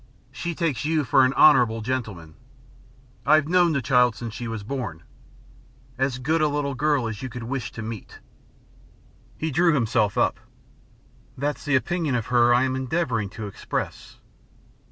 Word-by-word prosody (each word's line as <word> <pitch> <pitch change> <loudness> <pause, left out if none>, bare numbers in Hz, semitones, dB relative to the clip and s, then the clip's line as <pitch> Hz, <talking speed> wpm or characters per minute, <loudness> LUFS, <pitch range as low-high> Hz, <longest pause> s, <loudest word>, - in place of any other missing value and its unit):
She 170 -1 -5
takes 160 -9 -1
you 155 0 +1
for 135 0 +4
an 130 +1 +2
honourable 125 -7 +5
gentleman. 110 -10 -4 0.9
I've 150 +3 +4
known 175 -1 +3
the 140 -3 -1
child 125 -3 +3
since 115 -2 -7
she 120 +1 -6
was 115 -2 -5
born. 110 - -5 0.9
As 135 -1 -1
good 155 +6 0
a 155 - +4
little 145 -1 -2
girl 145 -2 +1
as 110 -2 -6
you 130 - -5
could 120 0 -7
wish 125 +1 -4
to 115 - -6
meet." 110 -2 -8 1.2
He 160 0 -2
drew 170 +2 +3
himself 110 -5 +1
up. - - +1 1.0
"That's 145 +4 -3
the 145 -2 +2
opinion 160 0 0
of 115 -3 -1
her 120 0 +5
I 120 +1 +4
am 130 0 0
endeavouring 130 - -1
to 110 - -5
express." 100 - -5
130 Hz, 160 wpm, -24 LUFS, 115-150 Hz, 1.2 s, honourable